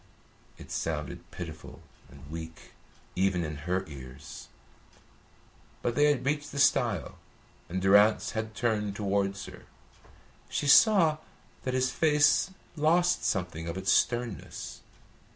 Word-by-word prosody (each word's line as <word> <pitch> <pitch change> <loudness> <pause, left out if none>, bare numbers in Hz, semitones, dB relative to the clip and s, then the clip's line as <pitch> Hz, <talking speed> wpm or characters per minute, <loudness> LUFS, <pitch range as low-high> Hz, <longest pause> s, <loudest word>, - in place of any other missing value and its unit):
It - - -12
sounded - - -4
pitiful - - -9 0.3
and 70 0 -14
weak, 80 0 -8 0.4
even 95 -1 +1
in 75 -2 -5
her 95 +1 0
ears; 65 -3 -10 1.4
but 120 - 0
they 145 - +3
had 145 -4 +2
reached 145 +1 -1
the 145 - -7
stile, 125 - +2 0.5
and 95 +2 -2
Durrance 100 +3 +4
had 110 -1 -4
turned 105 -3 -1
towards 100 -1 -1
her. - - -12 0.8
She - - -2
saw 160 0 +6 0.5
that 130 0 -1
his 130 0 +1
face 150 +4 +3 0.3
lost 170 +3 +2
something 90 -4 -2
of 85 +2 -4
its 95 0 0
sternness. 120 -4 -1
110 Hz, 120 wpm, -29 LUFS, 95-140 Hz, 1.4 s, saw